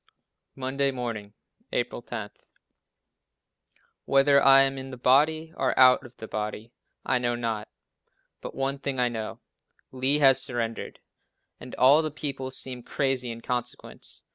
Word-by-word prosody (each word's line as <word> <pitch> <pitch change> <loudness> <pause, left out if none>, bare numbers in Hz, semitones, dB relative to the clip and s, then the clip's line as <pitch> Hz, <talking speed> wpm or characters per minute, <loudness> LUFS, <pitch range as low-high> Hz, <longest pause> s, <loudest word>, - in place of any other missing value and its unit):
Monday 135 +1 -1
Morning, 115 -5 -5 0.4
April - - -2
10. - - -6 1.7
"Whether 140 0 +4
I 135 0 +7
am 135 0 -1
in 130 0 -8
the 130 - -8
body, 155 +6 +2
or 130 -1 0
out 130 +1 +6
of 120 - -23
the 110 - -8
body, 105 +2 -5 0.3
I 125 - +1
know 120 -1 0
not, 115 -3 -3 0.7
but - - -8
one 135 +1 -2
thing 135 -2 -3
I 125 -1 +2
know," 110 -2 -6 0.5
Lee 130 +3 +1
has 135 -3 +5
surrendered! 115 -2 -4 0.6
and 125 - -9
all 140 +5 +6
the 155 - -2
people 135 -3 -4
seem 130 -1 -3
crazy 130 -1 -1
in 115 0 -7
consequence. 125 0 -5
130 Hz, 140 wpm, -26 LUFS, 120-135 Hz, 1.7 s, I